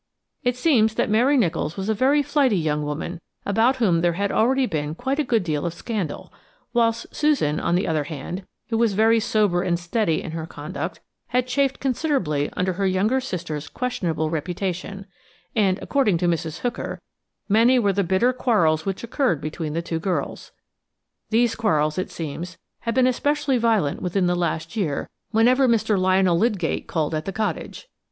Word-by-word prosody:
It 250 -3 0
seems 230 -7 +3
that - - 0
Mary 250 +6 +4
Nicholls 170 - 0
was 195 +1 -3
a 220 - +2
very 275 +7 +3
flighty 270 -7 +2
young 150 -3 0
woman, 150 +4 -4 0.2
about 225 +6 +3
whom 190 -10 +2
there 175 0 +2
had 200 +3 -1
already 260 +4 +3
been 150 -6 -3
quite 265 - -2
a - - +3
good 235 -6 +1
deal 150 -4 -1
of 170 -1 -3
scandal, 205 -10 -4 0.4
whilst 230 -1 +1
Susan, 285 - +2
on 170 - +1
the 185 - +1
other 155 -3 0
hand–who 175 - -6
was 230 -3 +3
very 225 +3 +4
sober 210 -5 +1
and 175 -2 0
steady 175 -1 0
in 165 - -6
her 160 0 -5
conduct–had 250 +7 -4
chafed 270 +1 0
considerably 250 - 0
under 185 0 +1
her 195 +2 0
younger 205 +8 +1
sister's 165 - -5
questionable 165 -11 -2
reputation, 185 +4 -3 0.5
and, 195 -4 +3
according 260 -11 +2
to 175 - 0
Mrs. 165 -2 -2
Hooker, 245 -1 -3 0.5
many 230 +5 +5
were 205 -5 +2
the 200 +1 +1
bitter 190 +8 +2
quarrels 185 -11 +2
which 195 +2 -3
occurred 235 - 0
between 155 +1 -4
the 170 +1 -2
two 165 -1 -3
girls. 185 +2 -3 0.8
These 230 +1 +3
quarrels, 155 -7 +1
it 185 - -3
seems, 165 +3 -6 0.2
had 230 0 -3
been 260 -1 +4
especially 275 +1 +1
violent 220 -11 +1
within 180 +1 0
the 175 - +2
last 165 0 -2
year 165 -10 -2 0.2
whenever 250 +4 +4
Mr. 225 -2 +2
Lionel 185 -2 +3
Lydgate 200 -7 0
called 160 -2 -1
at 155 0 -2
the 195 - -3
cottage. 205 -5 -4
195 Hz, 175 wpm, -23 LUFS, 165-235 Hz, 0.8 s, many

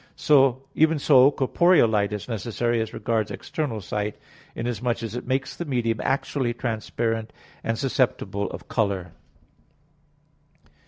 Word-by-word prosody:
Even 160 0 +3
so 140 -2 +6
corporeal 165 +2 +4
light 105 -2 +1
is 105 -2 -5
necessary 120 +1 -1
as 110 -1 -3
regards 110 -3 -1
external 145 -8 -4
sight, 105 +2 -3 0.4
inasmuch 120 0 -2
as 115 -2 -4
it 125 - -6
makes 135 +1 -1
the - - -4
medium 120 -7 -1
actually 130 -1 -1
transparent, 115 -1 -2 0.3
and 115 0 -1
susceptible 125 -7 0
of - - -9
color. 100 -5 -1
115 Hz, 120 wpm, -25 LUFS, 110-130 Hz, 0.4 s, so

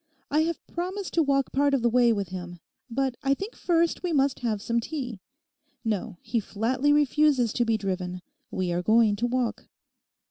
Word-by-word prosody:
'I 300 - +3
have 335 -1 -4
promised 370 +3 -4
to 335 - +3
walk 275 -3 +1
part 280 +1 +3
of 250 - -1
the - - +4
way 240 0 +4
with 200 -5 -1
him. 175 -1 -7 0.3
But 265 +2 0
I 275 -1 +2
think 395 - -6
first 335 -1 +1
we 360 - -2
must 275 -3 +2
have 225 -4 -1
some 235 +3 0
tea. 250 -4 -5 0.7
No; 210 -5 -2
he 230 +1 0
flatly 240 +7 0
refuses 290 -5 +3
to 240 - +1
be 225 -1 +2
driven. 185 -2 -3 0.3
We 185 -2 -2
are 175 +1 0
going 220 +2 +4
to 240 +3 0
walk. 245 -1 -2
245 Hz, 185 wpm, -27 LUFS, 215-290 Hz, 0.7 s, the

